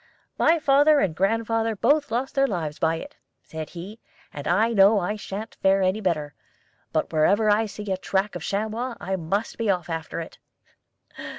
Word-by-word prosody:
'My 335 Hz, -, +4 dB
father 290 Hz, 0 st, +4 dB
and 180 Hz, -, 0 dB
grandfather 225 Hz, +3 st, 0 dB
both 285 Hz, +8 st, +2 dB
lost 245 Hz, +4 st, -2 dB
their 275 Hz, -1 st, +3 dB
lives 160 Hz, -, -4 dB
by 160 Hz, 0 st, +2 dB
it,' 165 Hz, -, -9 dB, 0.3 s
said 160 Hz, -1 st, -7 dB
he, 190 Hz, +6 st, -9 dB, 0.3 s
'and 145 Hz, 0 st, -6 dB
I 220 Hz, +6 st, +2 dB
know 200 Hz, +1 st, +6 dB
I 200 Hz, +3 st, -2 dB
sha'n't 210 Hz, +1 st, -7 dB
fare 195 Hz, 0 st, +3 dB
any 185 Hz, +4 st, +1 dB
better; 155 Hz, -6 st, -1 dB, 0.6 s
but -, -, -1 dB
whenever 200 Hz, +8 st, +3 dB
I 215 Hz, +2 st, +2 dB
see 210 Hz, +1 st, -8 dB
the 195 Hz, -2 st, -2 dB
track 195 Hz, +2 st, -1 dB
of -, -, -5 dB
a -, -, -6 dB
chamois, 220 Hz, +5 st, -2 dB
I 190 Hz, +4 st, -2 dB
must 190 Hz, +7 st, -3 dB
be 225 Hz, -2 st, 0 dB
off 175 Hz, -3 st, 0 dB
after 165 Hz, 0 st, -4 dB
it.' 165 Hz, -, -8 dB
200 Hz, 185 wpm, -24 LUFS, 175-225 Hz, 0.6 s, know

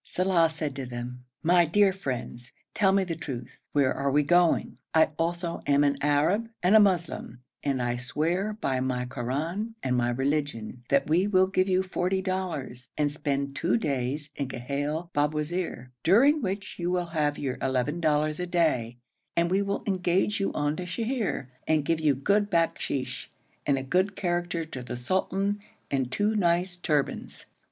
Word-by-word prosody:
Saleh 180 Hz, -3 st, +2 dB
said 150 Hz, -3 st, -4 dB
to 135 Hz, -, -3 dB
them, 125 Hz, +1 st, -6 dB, 0.2 s
'My 175 Hz, +1 st, +5 dB
dear 195 Hz, +4 st, +4 dB
friends, 125 Hz, -7 st, -5 dB, 0.2 s
tell 195 Hz, -2 st, +3 dB
me 195 Hz, 0 st, +3 dB
the 170 Hz, -3 st, -3 dB
truth. 130 Hz, -7 st, -7 dB
Where 140 Hz, -3 st, +3 dB
are 140 Hz, 0 st, -1 dB
we 145 Hz, +2 st, +3 dB
going? 175 Hz, +2 st, +3 dB, 0.2 s
I 160 Hz, 0 st, +6 dB
also 170 Hz, +1 st, -1 dB
am 145 Hz, 0 st, +4 dB
an 140 Hz, -1 st, +2 dB
Arab 155 Hz, +10 st, +2 dB
and 185 Hz, +4 st, +5 dB
a -, -, +10 dB
Moslem, 175 Hz, -, +1 dB, 0.2 s
and 135 Hz, -2 st, 0 dB
I 120 Hz, 0 st, 0 dB
swear 170 Hz, +11 st, -1 dB
by 130 Hz, -8 st, 0 dB
my 130 Hz, -1 st, -1 dB
Koran 160 Hz, -, -3 dB
and 125 Hz, -1 st, +1 dB
my 120 Hz, -1 st, +2 dB
religion, 135 Hz, -3 st, -2 dB
that 140 Hz, 0 st, +3 dB
we 175 Hz, +6 st, +3 dB
will 190 Hz, -2 st, +4 dB
give 190 Hz, 0 st, +1 dB
you 185 Hz, 0 st, +3 dB
forty 190 Hz, 0 st, -1 dB
dollars, 170 Hz, -10 st, -4 dB
and 145 Hz, -1 st, +1 dB
spend 140 Hz, -2 st, -2 dB
two 175 Hz, +10 st, +1 dB
days 145 Hz, -, -2 dB
in 140 Hz, -, -2 dB
Ghail 145 Hz, +6 st, -3 dB
Babwazir, 150 Hz, -2 st, -1 dB
during 270 Hz, -, +5 dB
which 195 Hz, -2 st, -4 dB
you 175 Hz, 0 st, -1 dB
will 180 Hz, -1 st, 0 dB
have 150 Hz, -2 st, +1 dB
your 130 Hz, -3 st, -3 dB
eleven 135 Hz, +5 st, 0 dB
dollars 155 Hz, -1 st, +1 dB
a 180 Hz, -, -2 dB
day; 130 Hz, -10 st, +1 dB, 0.4 s
and 170 Hz, +1 st, +2 dB
we 195 Hz, +2 st, +3 dB
will 200 Hz, 0 st, -2 dB
engage 190 Hz, +1 st, +1 dB
you 195 Hz, -, 0 dB
on 145 Hz, +1 st, 0 dB
to 180 Hz, -, -5 dB
Sheher, 230 Hz, -, -2 dB, 0.2 s
and 155 Hz, -2 st, +2 dB
give 165 Hz, +1 st, +1 dB
you 150 Hz, -3 st, +3 dB
good 205 Hz, +10 st, +2 dB
bakshish, 165 Hz, -6 st, -1 dB, 0.4 s
and 140 Hz, -2 st, +3 dB
a 135 Hz, -, -3 dB
good 185 Hz, +8 st, +1 dB
character 175 Hz, -2 st, -1 dB
to 135 Hz, -5 st, -7 dB
the 120 Hz, 0 st, -6 dB
sultan 190 Hz, +8 st, 0 dB, 0.3 s
and 130 Hz, -2 st, 0 dB
two 210 Hz, +1 st, +1 dB
nice 180 Hz, -1 st, +2 dB
turbans.' 150 Hz, -5 st, -2 dB
160 Hz, 175 wpm, -27 LUFS, 135-185 Hz, 0.4 s, a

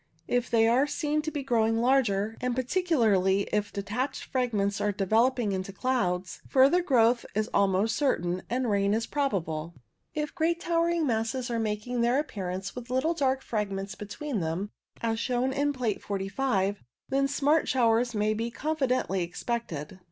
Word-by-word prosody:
If 245 Hz, 0 st, 0 dB
they 225 Hz, -1 st, +4 dB
are 255 Hz, +5 st, +3 dB
seen 300 Hz, 0 st, -1 dB
to 310 Hz, -, -3 dB
be 290 Hz, -3 st, -4 dB
growing 225 Hz, -3 st, +2 dB
larger, 225 Hz, -4 st, +2 dB
and 250 Hz, -1 st, -1 dB
particularly 235 Hz, -, +2 dB
if 210 Hz, -1 st, 0 dB
de 200 Hz, -1 st, -4 dB
tached 250 Hz, +7 st, -3 dB
fragments 210 Hz, -6 st, -1 dB
are 205 Hz, 0 st, +1 dB
developing 220 Hz, +4 st, +2 dB
into 190 Hz, 0 st, -3 dB
clouds, 190 Hz, -6 st, -1 dB
further 275 Hz, +7 st, +5 dB
growth 240 Hz, -7 st, +3 dB
is 215 Hz, +2 st, 0 dB
almost 200 Hz, +3 st, +2 dB
certain, 180 Hz, -, 0 dB
and 250 Hz, +1 st, 0 dB
rain 200 Hz, -1 st, +2 dB
is 225 Hz, 0 st, -1 dB
probable. 170 Hz, -, -2 dB, 0.4 s
If 300 Hz, -1 st, -2 dB
great 335 Hz, 0 st, +1 dB
towering 335 Hz, -1 st, +1 dB
masses 240 Hz, +1 st, -1 dB
are 230 Hz, -, 0 dB
making 225 Hz, +3 st, -2 dB
their 240 Hz, +2 st, +3 dB
appearance 195 Hz, -9 st, -4 dB
with 245 Hz, -1 st, -8 dB
little 260 Hz, +7 st, +1 dB
dark 265 Hz, -4 st, 0 dB
fragments 200 Hz, -2 st, -3 dB
between 220 Hz, +4 st, -4 dB
them, 170 Hz, +5 st, -3 dB, 0.3 s
as 225 Hz, -1 st, 0 dB
shown 250 Hz, +2 st, 0 dB
in 285 Hz, +1 st, +1 dB
Plate 245 Hz, -7 st, -2 dB
45, 200 Hz, 0 st, -1 dB, 0.3 s
then 275 Hz, 0 st, +2 dB
smart 290 Hz, +3 st, +2 dB
showers 240 Hz, -1 st, +2 dB
may 210 Hz, +1 st, +1 dB
be 225 Hz, +2 st, -2 dB
confidently 255 Hz, -, -1 dB
expected. 180 Hz, -2 st, -4 dB
230 Hz, 160 wpm, -28 LUFS, 200-265 Hz, 0.4 s, further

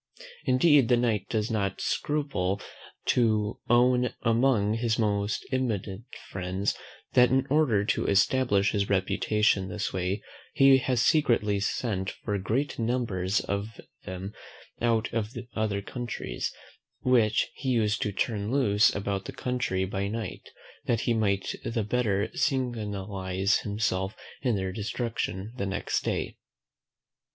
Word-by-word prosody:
Indeed 135 Hz, 0 st, +5 dB
the 125 Hz, -, +4 dB
Knight 115 Hz, -5 st, 0 dB
does 110 Hz, 0 st, -1 dB
not 100 Hz, -4 st, -1 dB
scruple 140 Hz, -11 st, -1 dB, 0.5 s
to 110 Hz, -3 st, +2 dB
own 125 Hz, +1 st, +4 dB
among 115 Hz, -3 st, +3 dB
his 115 Hz, 0 st, 0 dB
most 105 Hz, -1 st, 0 dB
intimate 110 Hz, -7 st, -1 dB, 0.3 s
friends, 95 Hz, +2 st, -1 dB, 0.4 s
that 125 Hz, 0 st, +6 dB
in 130 Hz, +1 st, +2 dB
order 130 Hz, -10 st, +3 dB
to -, -, 0 dB
establish 100 Hz, 0 st, +3 dB
his 100 Hz, -2 st, 0 dB
reputation 100 Hz, 0 st, +2 dB
this 105 Hz, 0 st, -3 dB
way, 95 Hz, +3 st, -2 dB, 0.3 s
he 135 Hz, -1 st, +7 dB
has 125 Hz, -3 st, +1 dB
secretly 115 Hz, -9 st, +3 dB
sent 100 Hz, -2 st, -1 dB
for 105 Hz, -, -4 dB
great 120 Hz, +11 st, -1 dB
numbers 110 Hz, -5 st, 0 dB
of 100 Hz, +2 st, -4 dB, 0.2 s
them 95 Hz, +2 st, -6 dB, 0.5 s
out 115 Hz, -1 st, +1 dB
of 110 Hz, 0 st, -2 dB, 0.2 s
other 105 Hz, -2 st, -1 dB
counties, 120 Hz, -, -4 dB, 0.5 s
which 115 Hz, -4 st, +3 dB
he 135 Hz, -, -4 dB
used 110 Hz, -4 st, +1 dB
to 105 Hz, -, 0 dB
turn 105 Hz, +1 st, -1 dB
loose 115 Hz, -5 st, +3 dB
about 100 Hz, -1 st, -2 dB
the -, -, -5 dB
country 125 Hz, -7 st, -1 dB
by 95 Hz, +1 st, -2 dB
night, 105 Hz, -3 st, -5 dB, 0.4 s
that 115 Hz, -1 st, +1 dB
he 120 Hz, -, +1 dB
might 100 Hz, -3 st, 0 dB
the 115 Hz, -1 st, -1 dB
better 105 Hz, -2 st, +1 dB
signalise 100 Hz, -6 st, 0 dB
himself 100 Hz, -2 st, -1 dB, 0.3 s
in 125 Hz, -4 st, +1 dB
their 95 Hz, -1 st, -2 dB
destruction 105 Hz, -1 st, -3 dB
the 100 Hz, -, -2 dB
next 95 Hz, -, -1 dB
day. -, -, -2 dB
110 Hz, 130 wpm, -28 LUFS, 100-120 Hz, 0.5 s, he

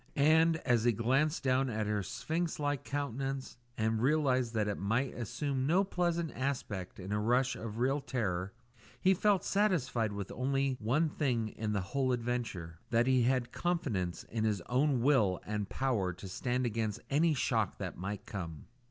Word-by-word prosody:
And, 160 Hz, +3 st, +5 dB
as 120 Hz, -4 st, +3 dB
he 120 Hz, -, +4 dB
glanced 135 Hz, -, +1 dB
down 130 Hz, 0 st, +2 dB
at 110 Hz, -2 st, -1 dB
her 105 Hz, 0 st, 0 dB
sphinx 160 Hz, -, -2 dB
like 145 Hz, -2 st, -1 dB
countenance 135 Hz, -1 st, -3 dB, 0.2 s
and 110 Hz, 0 st, +1 dB
realised 130 Hz, -4 st, +2 dB
that 105 Hz, -1 st, +1 dB
it 105 Hz, -, -2 dB
might 115 Hz, +7 st, 0 dB
assume 130 Hz, +3 st, -2 dB
no 180 Hz, +6 st, +4 dB
pleasant 175 Hz, -4 st, -1 dB
aspect 110 Hz, -10 st, -3 dB
in 95 Hz, +2 st, -6 dB
a 105 Hz, -, +1 dB
rush 125 Hz, +4 st, +2 dB
of 110 Hz, -1 st, -6 dB
real 135 Hz, +4 st, +2 dB
terror, 100 Hz, -9 st, -2 dB, 0.5 s
he 190 Hz, -, +4 dB
felt 200 Hz, +1 st, +2 dB
satisfied 140 Hz, -, +1 dB
with 100 Hz, -1 st, -5 dB
only 135 Hz, +1 st, 0 dB
one 130 Hz, +9 st, +2 dB
thing 125 Hz, -7 st, 0 dB
in 105 Hz, 0 st, -3 dB
the 100 Hz, -, 0 dB
whole 130 Hz, -2 st, +2 dB
adventure 115 Hz, -9 st, -3 dB
that 120 Hz, 0 st, +3 dB
he 130 Hz, -1 st, +4 dB
had 125 Hz, 0 st, +1 dB
confidence 105 Hz, -, -1 dB
in 110 Hz, -1 st, -3 dB
his 105 Hz, -4 st, +1 dB
own 130 Hz, -, +1 dB
will 110 Hz, -10 st, +3 dB
and 105 Hz, -1 st, -3 dB
power 110 Hz, -9 st, 0 dB
to 95 Hz, +3 st, -9 dB
stand 125 Hz, +7 st, -1 dB
against 110 Hz, -2 st, -1 dB
any 155 Hz, +2 st, +3 dB
shock -, -, 0 dB
that -, -, -5 dB
might 100 Hz, +3 st, -5 dB
come. 85 Hz, -6 st, -6 dB
125 Hz, 170 wpm, -32 LUFS, 105-140 Hz, 0.5 s, And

